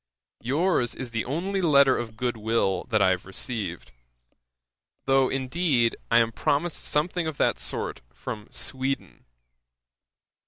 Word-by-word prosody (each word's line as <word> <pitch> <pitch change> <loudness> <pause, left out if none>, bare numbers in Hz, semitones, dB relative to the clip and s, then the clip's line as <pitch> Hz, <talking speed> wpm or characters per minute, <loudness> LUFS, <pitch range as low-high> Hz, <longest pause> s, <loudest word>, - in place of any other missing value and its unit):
Your's 140 - +1
is 130 -3 -6
the 115 0 -2
only 185 +9 -1
letter 140 -5 +5
of 115 -2 -5
goodwill 110 -5 0
that 110 -4 +3
I 95 - +5
have 90 -1 -1
received; 95 -2 -5 1.1
though, 135 -1 +4
indeed, 130 -2 +1
I 115 - +5
am 115 -1 +4
promised 150 +8 -1
something 165 +3 0
of 155 -3 -4
that - - +2
sort - - -3
from 105 - -7
Sweden. 135 +1 -3
130 Hz, 125 wpm, -26 LUFS, 115-150 Hz, 1.1 s, letter